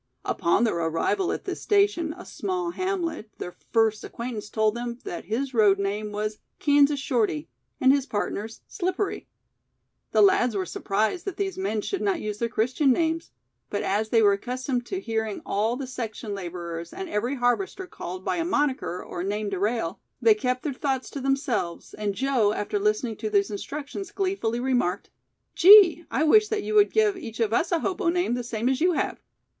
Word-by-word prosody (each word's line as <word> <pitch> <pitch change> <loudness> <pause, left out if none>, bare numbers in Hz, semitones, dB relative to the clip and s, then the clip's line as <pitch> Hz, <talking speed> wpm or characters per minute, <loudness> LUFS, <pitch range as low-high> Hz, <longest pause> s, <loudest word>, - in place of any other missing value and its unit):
Upon 170 +7 +2
their 220 -7 +1
arrival 165 - 0
at - - -4
this - - -4
station, 400 -6 +2
a - - -10
small 365 -3 -3
hamlet, 345 - -3
their 180 - -5
first 220 +2 0
acquaintance 230 -3 -6
told 215 -1 +2
them 235 0 -4
that 175 - -6
his 260 +5 -2
road 210 -4 +5
name 205 +2 -2
was 210 +1 -3 0.2
"Kansas 285 -1 +4
Shorty" 220 - 0 0.3
and 260 - +6
his 280 -1 0
partner's 215 -1 -3
"Slippery". 370 +2 -2 0.8
The - - +5
lads 385 - +4
were 190 -2 -1
surprised 215 - -1
that 390 -4 -4
these 390 -2 -2
men 365 - -1
should 390 - -3
not 390 -4 +1
use 210 -1 -4
their 235 - 0
Christian 255 +5 +2
names, 325 +4 0 0.4
but 205 - -2
as 210 +3 0
they 225 -1 +4
were 200 -1 +6
accustomed 250 +3 -3
to 380 - -3
hearing 220 - -2
all 220 +4 0
the 270 +1 -4
section 230 -4 -5
laborers 170 -3 -6
and 380 +1 -5
every 240 0 -1
harvester 270 +10 0
called 185 - -7
by - - 0
a 335 - 0
"monicker" 290 - -1
or 175 - -4
"name 205 +2 -2
de 195 -2 -3
rail", 210 -4 -1 0.2
they 445 - +6
kept 255 -10 -2
their 295 - -2
thoughts 265 -1 -2
to 280 - -5
themselves, 265 -10 -1
and 205 -2 -3
Joe, 255 -5 +2
after 205 -1 -2
listening 215 +2 0
to 215 - -3
these 200 -1 +2
instructions 290 - -5
gleefully 375 - -1
remarked: 245 -7 0 0.4
"Gee, 365 -3 +8
I 300 - +1
wish 425 +7 +5
that 425 -2 -2
you - - -3
would 420 -1 +5
give 430 -2 +3
each 225 -9 -8
of 225 -1 +1
us 320 - +1
a 335 -2 +2
hobo 370 -1 0
name 355 -7 +1
the 245 0 -2
same 230 0 -2
as 265 +2 +1
you 355 +1 +4
have." - - -2
245 Hz, 190 wpm, -26 LUFS, 210-335 Hz, 0.8 s, Gee